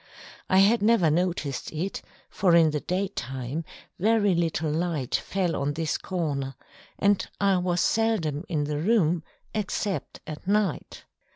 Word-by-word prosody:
I 190 - +4
had 205 +4 +5
never 210 -7 +4
noticed 165 -5 -1
it, 170 +5 -3 0.3
for 180 -3 +3
in 165 -2 +5
the 150 - -1
daytime 150 - -3 0.4
very 210 0 +3
little 165 -2 0
light 160 -5 -2
fell 180 -4 0
on 140 +1 -1
this 160 +1 -1
corner, 145 -7 -3 0.4
and 200 -1 +3 0.2
I 195 -1 +3
was 180 -1 0
seldom 190 -10 +1
in 155 -4 0
the 145 0 -2
room 175 -3 +2 0.3
except 210 -2 -3
at 155 +3 -8
night. 200 -4 0
175 Hz, 135 wpm, -26 LUFS, 150-195 Hz, 0.4 s, had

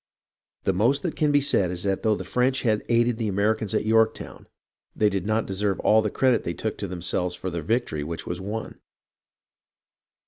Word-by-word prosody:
The 95 - +1
most 120 +9 +2
that 175 - -2
can 150 -1 +2
be 145 0 +4
said 100 -9 +3
is 90 0 -4
that 100 -1 0
though 110 -1 +2
the - - -6
French 130 +2 0
had 110 -3 +1
aided 120 0 +2
the 115 -2 -2
Americans 105 +1 0
at - - 0
Yorktown, 110 0 0 0.5
they 105 - +3
did 95 -1 -3
not 110 +1 +1
deserve 100 0 -1
all 110 +1 +4
the 105 - -1
credit 130 +2 +2
they 85 - -3
took 110 - -3
to 100 - -3
themselves 90 0 -2
for 95 +1 -5
the 85 -1 -3
victory 85 -4 -1
which 80 +2 -5
was 90 +1 -4
won. 105 +3 -5
105 Hz, 200 wpm, -25 LUFS, 95-115 Hz, 0.5 s, be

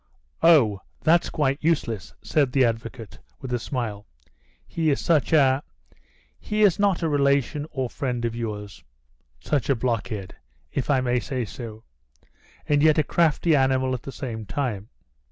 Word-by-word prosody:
"Oh, 120 - +5 0.2
that's 170 +2 +3
quite 140 -2 0
useless," 130 - -1
said 140 -4 +1
the 135 -2 +4
advocate, 115 -2 -4 0.2
with 125 -1 -6
a 120 - 0
smile. 110 -5 -4 0.6
"He 160 -2 -1
is 140 - +1
such 160 -4 +1
a 135 -3 +4 0.8
he 215 0 0
is 200 -3 +4
not 200 -4 +2
a - - +2
relation 140 0 +1
or 130 -3 -2
friend 120 -1 -3
of 115 -1 -2
yours? 105 -4 -6 0.6
such 145 -4 -1
a 140 - +4
blockhead, 110 -5 -3 0.4
if 135 - -3
I 135 -3 +3
may 125 -1 +1
say 130 -2 -3
so, 110 -2 -9 0.8
and 145 -1 +2
yet 155 0 +5
a 155 - +4
crafty 160 +1 +2
animal 130 -1 +2
at 125 - -3
the 135 - -8
same 115 -5 -6
time." 110 -4 -3
130 Hz, 155 wpm, -24 LUFS, 115-150 Hz, 0.8 s, Oh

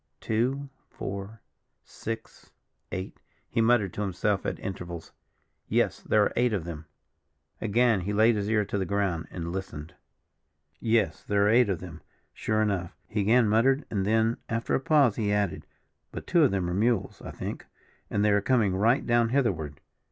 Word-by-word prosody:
"Two, 130 +5 -1 0.2
four, 100 +2 -7 0.4
six, 115 0 -7 0.4
eight," 95 +1 -6 0.3
he 115 - 0
muttered 110 -5 +3
to - - -4
himself 100 +1 -1
at - - -2
intervals. 85 -3 -6 0.6
"Yes, - - +1
there 105 - +3
are - - 0
eight 120 -1 +2
of 95 -5 -1
them." 80 -2 -7 0.7
Again 115 -1 +3
he 100 +4 -3
laid 110 +2 +4
his 105 0 -2
ear 105 -2 +2
to 100 0 -2
the 95 - -1
ground 95 -4 -1
and 85 -1 -5
listened. 85 -5 -6 0.9
"Yes, 115 -1 +1
there 100 0 +2
are - - +4
eight 120 0 +5
of 95 -4 -1
them, 85 -3 -9 0.3
sure 110 0 0
enough," 95 -4 -2
he 105 -1 -1
again 115 +3 +4
muttered; 130 +7 +3
and 100 -3 0
then, 110 +3 +2
after 115 0 -1
a - - +3
pause, 145 - +3
he 105 -3 0
added: 105 -3 -1 0.4
"But - - -7
two 175 - +3
of - - +4
them 95 -3 -1
are 90 - -2
mules, 115 +5 0
I - - -6
think; - - -6 0.4
and 105 0 +1
they 105 - +4
are 100 0 +3
coming 105 -5 +2
right 115 +7 +2
down 120 -1 +3
hitherward." 90 - -1
105 Hz, 175 wpm, -27 LUFS, 95-115 Hz, 0.9 s, eight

